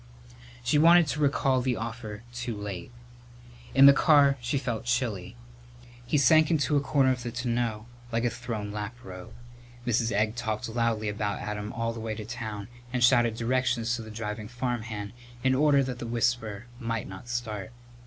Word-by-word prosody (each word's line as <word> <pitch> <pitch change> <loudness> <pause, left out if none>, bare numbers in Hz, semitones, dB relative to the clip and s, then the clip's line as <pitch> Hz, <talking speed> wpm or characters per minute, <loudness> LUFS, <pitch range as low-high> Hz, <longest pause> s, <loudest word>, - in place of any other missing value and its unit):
She 135 +5 +3
wanted 170 +2 +7
to 150 - -2
recall 135 -3 +2
the 125 -1 0
offer 115 -2 -6
too 120 -3 -4
late. 100 -3 -6 0.8
In 135 0 +8
the 140 - +10
car 140 -1 +5
she 125 +3 -1
felt 120 -5 -3
chilly. 120 - -1 0.7
He 150 - +2
sank 155 +3 +5
into 155 -2 +2
a 145 - +3
corner 135 -1 +3
of 125 -1 -2
the 120 -1 -4
tonneau 120 -2 -2 0.3
like 115 0 0
a 120 - +1
thrown 110 -5 -5
laprobe. 105 -3 -7 0.5
Mrs. 115 -1 +1
Egg 110 +2 +1
talked 110 -3 -3
loudly 115 -1 0
about 105 0 -2
Adam 105 0 -4
all 115 0 -2
the 115 - -7
way 110 -1 -3
to 110 - -7
town 110 -3 -5 0.2
and 125 -1 0
shouted 120 -2 +4
directions 120 0 0
to 120 - -5
the 110 - -9
driving 105 0 -5
farmhand 115 -4 -4 0.3
in 130 0 +3
order 140 0 +4
that 130 -2 -4
the 120 - -5
whisper 115 -2 -1
might 115 -3 -3
not 95 +6 -10
start. 110 -4 -4
120 Hz, 175 wpm, -28 LUFS, 110-125 Hz, 0.8 s, the